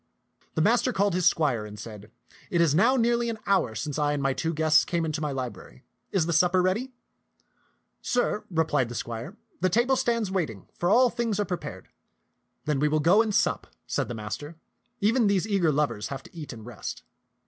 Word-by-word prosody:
The 160 - +2
master 240 +5 +3
called 200 -3 +1
his 180 -1 +2
squire 140 -11 +2
and 105 0 -9
said, 105 -1 -9 0.2
" - - -23
It 175 - +1
is 165 -4 +4
now 230 - +4
nearly 235 -1 +2
an 225 - -3
hour 185 - +1
since 145 +7 -3
I 145 0 +2
and 145 -1 -2
my 135 0 +2
two 165 +4 -2
guests 155 0 +4
came 170 -2 -1
into 155 0 -3
my 150 -2 -1
library. 125 - -6 0.3
Is 185 -5 +2
the 170 - -1
supper 180 +3 +4
ready? 195 +9 0 0.6
" - - -41 0.3
"Sir," 245 -3 0
replied 160 -8 +1
the 120 - -7
squire, 115 0 -5
" - - -38
the 185 - +3
table 240 +7 +3
stands 230 -5 0
waiting, 140 - -3
for 175 - -1
all 245 +3 +5
things 230 -4 -1
are 205 - +1
prepared." 180 -3 -6 0.4
" - - -49
Then 150 -3 0
we 150 - +3
will 155 +1 +1
go 175 +8 +5
and 225 -2 0
sup," - - +1 0.2
said - - -1
the 120 - -5
master. 110 +9 -6 0.2
" 240 -1 -46
Even 225 +2 +3
these 200 0 +1
eager 190 -7 +2
lovers 145 -7 -1
have 135 -1 -6
to - - -17
eat 155 -3 -7
and 110 -3 -10
rest." 120 -3 -7
170 Hz, 215 wpm, -27 LUFS, 140-205 Hz, 0.6 s, all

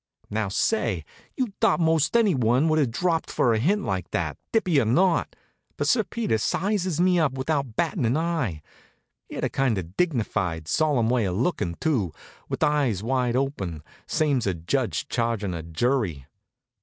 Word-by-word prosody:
Now 110 0 0
say, 105 - 0 0.3
you'd 250 -6 -1
thought - - +3
most 160 +5 +3
anyone 135 - +3
would 155 0 +3
have 140 -5 +2
dropped 165 +7 0
for 120 - +2
a 110 - +1
hint 195 - +1
like 95 -2 -2
that, 80 -5 -2 0.2
dippy 180 -9 +3
or - - 0
not. 170 - +2 0.4
But - - -1
Sir 230 -3 +3
Peter 210 - -1
sizes 185 - 0
me 180 0 +4
up 155 -5 +2
without 135 -3 -2
battin' 165 - 0
an 120 +6 +2
eye. 155 - -1 0.7
He - - -8
had - - -4
a - - +1
kind 130 -5 +1
of 90 -1 -6
dignified, 100 - -1
solemn 120 - +2
way 125 -4 +2
of 90 -1 -2
lookin', 105 - -1
too, 110 - 0 0.4
with - - -1
eyes 135 -10 +1
wide 125 0 0
open, 100 - -2 0.2
same's 145 -8 +1
a 95 - 0
judge 80 0 -1
chargin' 115 -5 -1
a 85 - -4
jury. 85 - -1
125 Hz, 170 wpm, -25 LUFS, 100-165 Hz, 0.7 s, me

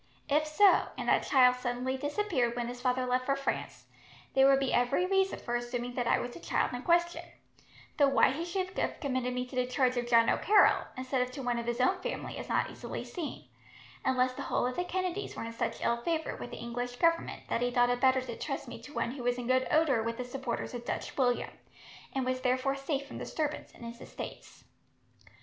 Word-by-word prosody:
If 305 +2 +2
so, 380 +6 +5
and - - -4
that - - +3
child 250 -2 +6
suddenly 250 +1 -2
disappeared 290 - 0
when 240 -1 -2
his 245 0 -7
father 255 0 +1
left 255 0 0
for 275 - +3
France, 275 0 -3 0.5
there 270 0 +6
would 270 0 +5
be 270 -1 0
every 245 +9 +2
reason 385 0 +2
for 240 - -3
assuming 240 0 -3
that 245 -1 -1
I - - +4
was 245 - -4
the - - -10
child - - 0
in 245 - -4
question; 345 +3 +2 0.8
though 285 - +5
why 275 -1 +4
he 305 +5 -3
should 370 +1 -3
have - - -1
committed 255 -3 -1
me 250 0 -2
to 255 - -11
the 250 0 +1
charge 255 0 +1
of 240 0 -1
John 230 -1 +5
O'Carroll, 420 0 +4
instead 255 0 -1
of 250 - 0
to 275 - -6
one 245 -1 0
of 235 - -5
his 240 +1 -1
own 255 +10 +3
family, - - -4
is - - -7
not - - +1
easily - - -6
seen; 335 -5 -6 0.6
unless 255 -1 +2
the - - -6
whole - - 0
of 250 0 -2
the 355 - -1
Kennedys 370 +2 -3
were - - -5
in 230 - -6
such 230 - -3
ill 235 - +2
favour, 320 +6 -2
with - - -7
the - - -8
English 245 +1 -4
Government, 335 +5 +1
that - - -1
he 245 - +2
thought 245 0 +3
it 245 0 -1
better 260 0 +4
to 245 -2 -6
trust - - -4
me - - -8
to 290 - -12
one 235 - 0
who 260 0 -7
was 245 0 0
in 245 - -4
good 255 +1 +2
odour 300 -7 +3
with 230 +1 -3
the 250 - -4
supporters 250 -1 -4
of 240 -1 -5
Dutch - - -4
William, 245 -3 +1 0.6
and 265 -1 0
was 255 0 -1
therefore 255 +2 +1
safe 275 0 -2
from - - -8
disturbance 305 -1 -3
in - - -14
his 235 +1 -8
estates." - - -9
255 Hz, 230 wpm, -31 LUFS, 245-290 Hz, 0.8 s, child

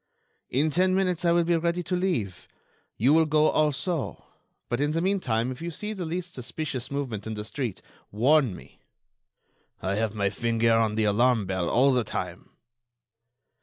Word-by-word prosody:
"In 150 +5 +1
ten 185 +4 +2
minutes 180 -3 0
I 170 - +4
will 170 0 +4
be 170 +1 +2
ready 170 +2 -1
to 180 - -1
leave. 155 - -2 0.5
You 130 +6 +4
will 160 0 +4
go 155 0 +4
also. 155 +1 -1 0.4
But 120 +3 -1
in 145 - +2
the 160 +2 0
meantime 135 - 0
if 130 - -8
you 170 - -3
see 210 +6 -5
the 185 -4 -5
least 175 +2 -4
suspicious 130 0 -4
movement 125 -7 -4
in 110 - -4
the 105 - -5
street, 115 -2 -4 0.3
warn 125 0 +3
me." - - -15 1.0
"I 95 +2 -2
have 110 +1 -1
my 100 -2 0
finger 115 0 +1
on 110 -2 +2
the 110 - +1
alarm 110 +1 +3
bell 95 -2 -1
all 135 +3 +4
the 125 -2 +2
time." 105 - -5
135 Hz, 175 wpm, -26 LUFS, 110-170 Hz, 1.0 s, I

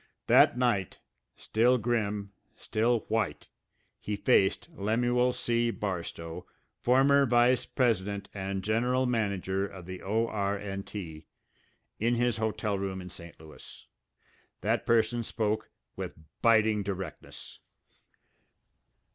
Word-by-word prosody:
That - - +6
night, 120 -7 0 0.4
still 120 +3 +2
grim, 105 -4 -1 0.2
still 115 +1 0
white, 110 -10 -2 0.5
he 105 - -3
faced 95 +3 +2
Lemuel 120 0 +1
C. 120 -1 0
Barstow, 85 -6 -5 0.3
former 135 +2 +4
vice 120 +1 +3
president 100 -5 0
and 95 -1 -3
general 125 +5 +1
manager 100 -5 -1
of 95 -3 -11
the 90 0 -7
O.R.& 105 -1 -1 0.2
T. 80 -7 -8 0.7
in 120 +2 +2
his 120 -1 +1
hotel 110 -2 -1
room 95 -1 -3
in 90 -1 -9
St. 85 -1 -11
Louis. 80 -1 -13 0.8
That - - 0
person 115 +1 +3
spoke 110 -1 -2 0.3
with - - -6 0.2
biting 110 -2 +4
directness. 95 -1 -7
110 Hz, 105 wpm, -29 LUFS, 95-120 Hz, 0.8 s, That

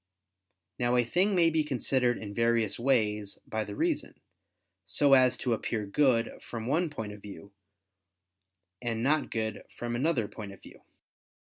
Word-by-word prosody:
Now 120 0 +2
a 120 - +3
thing 190 - +2
may 170 -2 +4
be 160 -1 +2
considered 130 -3 +1
in 100 -2 -7
various 115 -2 +1
ways 105 -5 +1
by 110 0 -2
the 100 - -7
reason, - - -1 0.6
so 140 -1 +3
as 130 -2 +5
to 125 - 0
appear 110 -1 -2
good 120 +1 +1
from 115 -2 -6
one 160 +7 +1
point 110 -8 -6
of 105 - -12
view, 100 0 -11 1.3
and 115 -2 -2
not 150 +2 +2
good 110 -2 -3
from 120 0 -3
another 130 -4 +1
point 105 -1 -8
of 100 - -16
view. - - -14
120 Hz, 155 wpm, -29 LUFS, 110-135 Hz, 1.3 s, as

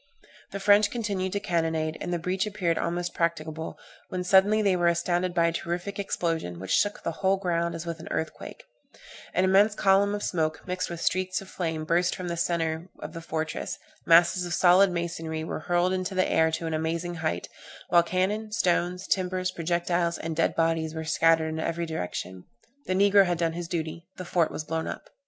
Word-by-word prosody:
The 200 - -5
French 205 +1 +5
continued 200 -5 -2
to 200 - 0
cannonade, 160 -3 -1
and 175 - -3
the 175 - +1
breach 185 +4 -1
appeared 185 -5 -1
almost 175 +1 -2
practicable, 160 -1 -2 0.3
when 185 0 -3
suddenly 195 +4 +5
they 195 -2 +3
were 175 -1 +2
astounded 175 +1 +1
by 170 -2 +4
a 170 - +2
terrific 175 +4 -4
explosion, 165 - -2
which 95 +1 -6
shook 205 0 +1
the - - -1
whole 195 0 +3
ground 170 -3 -1
as 165 0 -6
with 170 -1 -5
an 160 - -10
earthquake; 160 - -5 0.7
an 185 - +3
immense 200 +3 +4
column 200 +1 +3
of 205 - -5
smoke, 160 -3 -1
mixed 180 0 -2
with 170 -1 -6
streaks 185 0 0
of 195 - -11
flame, 160 -3 -3
burst 175 +2 +2
from 180 -1 -5
the 170 - -2
centre 165 0 -1
of - - -8
the 165 - -7
fortress, 160 -1 -3 0.3
masses 170 +2 +5
of 175 -1 -2
solid 185 +3 +6
masonry 165 -2 -3
were 160 - -4
hurled 175 +3 +1
into 185 0 -2
the 185 - +2
air 160 0 +3
to 160 +1 -3
an 160 - -2
amazing 165 +2 -2
height, 90 - -2 0.4
while 175 - +6
cannon, 195 +5 -1
stones, 180 -2 0
timbers, 185 -1 0
projectiles, 170 0 0
and 160 0 -4
dead 165 - +1
bodies, 165 -1 0
were 160 0 -4
scattered 160 0 +3
in 160 0 -4
every 170 +1 -2
direction 95 - -5 0.4
the 185 - +1
negro 200 +1 +6
had 175 -2 0
done 165 -1 0
his 170 0 -5
duty 165 0 -4
the 185 - -6
fort 170 -2 +1
was 155 - -5
blown 160 +1 -3
up. - - -7
170 Hz, 195 wpm, -27 LUFS, 165-185 Hz, 0.7 s, solid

